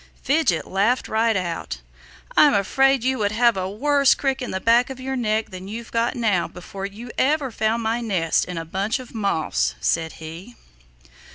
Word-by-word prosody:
Fidget 275 - +1
laughed 205 +7 +1
right 225 0 +1
out. 175 -3 -3 0.6
"I'm 295 - +6
afraid 270 +6 +3
you 260 0 0
would 205 -1 +1
have 235 0 +4
a 185 0 -2
worse 280 +6 +3
crick 270 -1 -1
in 250 - -4
the 190 - -2
back 235 +5 +3
of 265 -1 -7
your 265 +1 -3
neck 220 -3 -1
than 185 0 -8
you've 225 +3 -7
got 230 +2 0
now 215 -7 +1
before 195 +2 -7 0.3
ever 295 +2 +2
you 260 - -5
found 225 +1 0
my 225 +2 0
nest 185 -8 +1
in 180 -1 -6
a 165 - -4
bunch 195 +9 -1
of 255 -2 -11
moss," 200 -8 0
said 165 -1 0
he. 165 +9 -10
225 Hz, 185 wpm, -22 LUFS, 190-255 Hz, 0.6 s, I'm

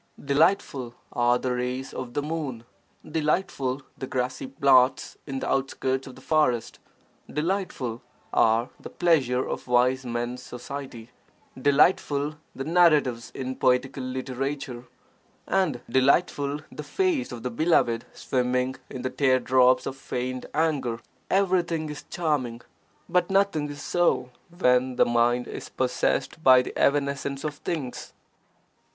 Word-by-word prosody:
Delightful 140 -4 +1 0.2
are 120 0 +3
the 125 0 -2
rays 125 +2 -3
of 125 -2 -6
the 145 - 0
moon, 145 -7 -4 0.4
delightful 150 -4 -1
the 130 - -6
grassy 130 +1 -2
plots 130 -1 +3
in 135 -1 -4
the - - -3
outskirts 130 0 -1
of 130 - -10
the - - -14
forest, 150 -7 +1 0.5
delightful 150 - -2 0.3
are 115 +2 +3
the - - -9
pleasure 135 -8 +2
of - - -5
wise 125 +2 +3
men's 120 +1 -3
society, 125 -2 -8 0.4
delightful 145 +1 +3 0.2
the 135 - -4
narratives 150 -7 +3
in 130 0 -4
poetical 130 +2 +1
literature, 130 0 -4 0.6
and 160 -10 0
delightful 140 +1 +2
the - - -7
face 320 - 0
of 120 -2 -7
the 125 - -2
beloved 120 -5 +2
swimming 125 0 -1
in 125 - -7
the 130 - -1
tear 130 -2 +3
drops 130 0 +4
of 135 - -4
(feigned) 130 -1 -4
anger. 140 -7 0 0.3
Everything 175 -5 +1
is 150 - -9
charming, 135 -9 -1 0.5
but 180 -1 +1
nothing 195 -7 +2
is 145 0 -8
so 175 -7 +1 0.2
when 130 -7 +2
the - - +4
mind 120 +1 +2
is - - -7
possessed 130 +4 -1
by 130 -2 +7
the - - -7
evanescence 140 0 0
of 155 -1 -2
things. 145 -8 -5
130 Hz, 130 wpm, -26 LUFS, 125-150 Hz, 0.6 s, by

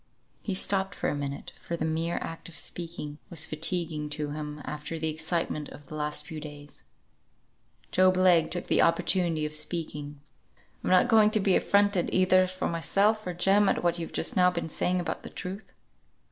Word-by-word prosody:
He 195 - -3
stopped 190 -1 0
for - - -1
a - - -2
minute, 140 -1 -5
for 170 - -4
the 160 - -2
mere 165 +2 -1
act 165 +1 -7
of 160 - -8
speaking 160 -3 -4
was 160 -2 -1
fatiguing 155 -1 -1
to 150 0 -3
him 150 0 -5
after 150 +2 -5
the 160 0 -1
excitement 160 -1 -2
of 145 - -12
the 155 - -11
last 150 0 -1
few 155 0 -7
weeks. 145 -1 -9 1.1
Job 185 0 +4
Legh 180 -3 +5
took 175 - -3
the - - +3
opportunity 165 -1 +2
of 150 - -5
speaking. 150 -2 -3 0.6
"I'm - - -1
not 185 -1 +5
going 220 -2 +6
to 215 - +1
be 195 -2 +3
affronted 200 -3 +2
either 185 0 +4
for 185 0 -3
myself 200 +5 +1
or 180 - -3
Jem 195 +3 +4
at - - 0
what 175 0 +1
you've 165 - -5
just - - -1
now 180 -1 +5
been 170 -2 -4
saying 180 +3 0
about 175 - -3
the - - -9
truth. 195 +3 -7
170 Hz, 190 wpm, -28 LUFS, 150-185 Hz, 1.1 s, going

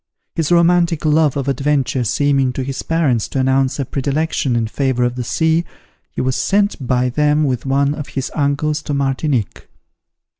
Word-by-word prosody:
His 165 0 -1
romantic 170 -2 +3
love 155 -2 +3
of 135 -1 -3
adventure 135 -1 0
seeming 135 +2 +1
to 130 - -3
his 135 +1 -4
parents 145 -9 0
to 135 - -3
announce 130 0 +1
a 140 - -2
predilection 140 -1 -1
in 115 -1 +1
favour 130 +2 -1
of 120 0 0
the 125 - -3
sea, 160 +6 +1 0.5
he - - -4
was 130 0 0
sent 200 -10 0
by 125 0 +1
them 150 +3 +2
with 130 -2 -1
one 140 +1 +2
of 150 -1 -6
his 135 -1 -4
uncles 150 +1 0
to 145 -1 -3
Martinique. 135 -4 -1
140 Hz, 175 wpm, -18 LUFS, 130-150 Hz, 0.5 s, romantic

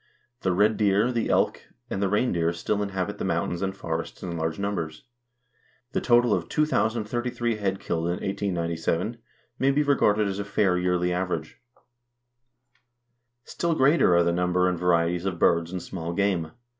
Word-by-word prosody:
The 95 - +1
red 105 +4 +3
deer, 105 +3 +3
the 115 -2 -1
elk, - - +2 0.3
and 95 - -3
the 100 - +1
reindeer 90 -6 +1
still 100 +4 -1
inhabit 95 -3 -3
the - - -2
mountains 85 - -1
and 95 0 -2
forests 80 -2 -5
in 85 -2 -4
large 80 -1 -2
numbers. 95 -6 -3 0.9
The - - -1
total 120 -2 +4
of 85 -2 -2
2033 120 -4 0
head 95 -2 -1
killed 80 0 -2
in 85 - 0
1897 90 +2 -2 0.4
may 135 - +3
be 145 +2 +2
regarded 105 -7 +3
as 100 0 -3
a - - -1
fair 100 -2 +1
yearly 90 0 +1
average. 90 -3 -3 1.8
Still 170 -1 -1
greater 135 - +4
are 85 - +5
the 85 - +2
number 90 +1 +1
and 90 -2 -1
varieties 85 0 +1
of 95 -3 -2
birds 85 0 +2
and 90 -2 -4
small 85 -2 -5
game. 90 -4 0
95 Hz, 160 wpm, -26 LUFS, 85-105 Hz, 1.8 s, are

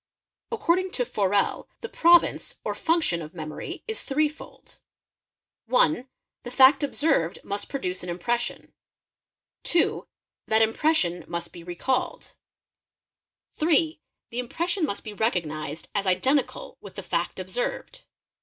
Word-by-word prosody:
According 370 -4 +1
to 245 - 0
Forel, 205 -4 0
the 465 - -4
province 345 +6 +4
or - - -1
function 320 - +1
of 155 +2 -9
memory 155 -2 -6
is 445 - -2
three 300 +2 +2
fold; 305 - -14 0.9
(1) 245 - +3 0.3
The 245 - -7
fact 260 +4 +6
observed 280 - +1
must 200 0 -4
produce 185 -10 -3
an 180 - -6
impression; 235 +8 -2 0.9
(2) 340 -1 +1 0.4
That 220 0 +4
impression 220 - +2
must 170 0 -5
be 175 - -9
recalled; 180 +10 -2 1.2
MEMORY 315 0 +4
73 325 - +5
(3) - - -33 0.3
The 235 - -3
impression 340 +8 -1
must 200 - -4
be 215 - -7
recognised 160 -8 -2
as 200 -1 -1
identical 270 - 0
with - - -11
the - - -6
fact - - -2
observed. - - -4
240 Hz, 130 wpm, -26 LUFS, -, 1.2 s, fact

